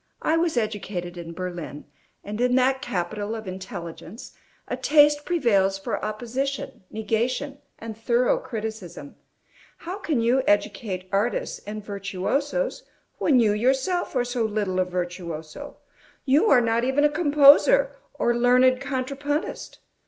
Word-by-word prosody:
I 315 - +2
was 330 -4 +1
educated 200 -5 -3
in 170 -1 -7
Berlin, 175 -4 -6 0.4
and 210 +3 -5
in 250 0 +3
that 260 +1 +2
capital 205 +4 -3
of 220 -2 -7
intelligence 185 +2 -8 0.3
a - - -2
taste 295 -1 +4
prevails 205 - +2
for 195 - -4
opposition, 250 +6 -3
negation, 240 +6 -2 0.2
and 225 -1 -7
thorough 235 +3 +1
criticism. 220 - -7 0.6
How 365 +4 -6
can 315 -10 -1
you 240 +3 +3
educate 205 -2 0
artists 205 +5 -1
and 210 0 -6
virtuosos, 255 - -2 0.4
when 275 -5 +4
you 215 -3 +3
yourself 265 - 0
are 245 -1 +1
so 245 -1 -1
little 205 -4 -1
a 185 - +2
virtuoso? 175 - -6 0.5
You 295 +11 +4
are 250 - +6
not 230 0 +1
even 265 +3 +2
a - - +7
composer 300 - +5 0.2
or 240 - +1
learned 250 +1 +4
contrapuntist. 280 +3 -3
235 Hz, 130 wpm, -24 LUFS, 200-275 Hz, 0.6 s, a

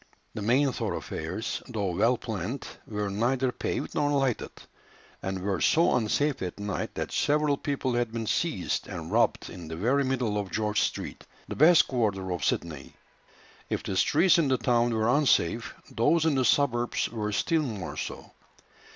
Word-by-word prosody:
The - - -5
main 130 +6 +3
thoroughfares, - - -4
though 100 -4 -2
well 120 +6 +3
planned, 110 +4 -4 0.2
were 105 -2 -3
neither 125 +5 +1
paved - - -3
nor 145 - +1
lighted, 135 -4 0 0.7
and 95 0 -3
were 95 -2 -1
so 165 +2 +4
unsafe 125 +5 0
at 90 +1 -5
night, 105 -1 -4
that - - -3
several 150 0 +2
people 140 -3 -2
had 120 -1 0
been 115 -1 -3
seized - - -1
and - - -6
robbed - - +1
in 85 -2 -9
the 80 - -5
very 125 +11 +2
middle 125 -6 0
of 100 -2 -4
George 105 0 0
Street, - - -3 0.2
the - - -5
best 160 +4 +6
quarter 100 -7 -1
of 90 -5 -3
Sydney. 75 -5 -2 0.7
If - - -2
the 95 - -3
streets 170 - +4
in 160 - +2
the 130 -1 +2
town 120 -1 +2
were 110 -1 +1
unsafe, 120 - +2 0.2
those 160 +8 +2
in 160 - +3
the 130 -2 +1
suburbs 120 -2 +2
were 105 -2 -3
still 160 +10 +1
more 105 - -4
so. - - -6
120 Hz, 170 wpm, -28 LUFS, 105-140 Hz, 0.7 s, best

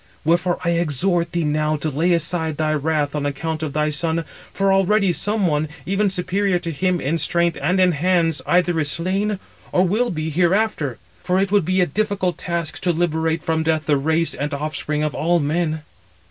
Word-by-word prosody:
Wherefore 175 +2 +2
I 170 - +1
exhort 170 +1 +1
thee 170 -1 -1
now 155 0 +1
to 155 +1 -2
lay 165 +6 +1
aside 160 -2 -1
thy 155 -1 +1
wrath 150 -1 0
on 150 -1 -2
account 155 +3 -3
of 155 -3 -3
thy 150 0 +1
son, 165 +2 0 0.3
for 195 0 +1
already 195 0 +3
some 205 +2 0
one, 155 -2 0 0.2
even 195 +2 +1
superior 190 +1 0
to 170 -1 -4
him 180 +3 0
in 160 +4 -1
strength 170 -1 +1
and 185 +2 +1
in 185 -1 +5
hands, 165 0 +1
either 175 -2 +2
is 150 -2 0
slain, 195 +6 -1 0.3
or 180 - +3
will 230 +7 +1
be 155 -1 -3
hereafter; 175 - +1 0.3
for 180 +1 +1
it 195 0 0
would 205 -5 +3
be 185 +2 +2
a - - +4
difficult 195 +1 -1
task 170 -3 -3
to 180 - +2
liberate 160 -1 0
[from 160 -1 0
death] 160 -1 0
the 150 - +3
race 160 +4 +1
and 145 +1 -3
offspring 150 +1 -2
of 150 - -1
all 170 +2 +1
men." 155 +1 -1
170 Hz, 195 wpm, -21 LUFS, 155-185 Hz, 0.3 s, in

